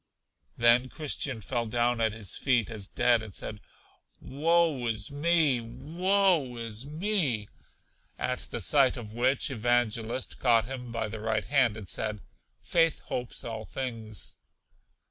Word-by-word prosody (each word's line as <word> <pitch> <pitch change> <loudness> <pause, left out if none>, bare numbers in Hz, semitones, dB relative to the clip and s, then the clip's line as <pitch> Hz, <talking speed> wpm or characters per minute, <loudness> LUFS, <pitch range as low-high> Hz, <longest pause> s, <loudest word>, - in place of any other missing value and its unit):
Then 120 +2 +5
Christian 140 -5 -2
fell 120 +2 -2
down 120 +1 +1
at 110 -1 +2
his 105 -3 -5
feet 120 -4 +1
as 105 -3 -4
dead, 120 +1 +3
and 110 -3 -9
said: 105 - -5 0.6
Woe 155 -2 +1
is 110 -1 -1
me! 150 -3 +3
Woe 165 - +1
is 115 +2 -4
me! 155 - -1 0.7
At 125 0 -2
the - - -5
sight 135 -4 +4
of 110 -3 -8
which, 130 +4 +1
Evangelist 120 0 0
caught 115 -4 +4
him 125 -1 -7
by 115 -1 -2
the 110 +1 -6
right 110 -1 -1
hand, 120 -3 +3
and 105 -4 -8
said: 105 +2 -2 0.4
Faith 165 -2 +2
hopes 125 -1 -3
all 110 -2 -5
things. 115 -5 -6
120 Hz, 140 wpm, -29 LUFS, 110-140 Hz, 0.7 s, Then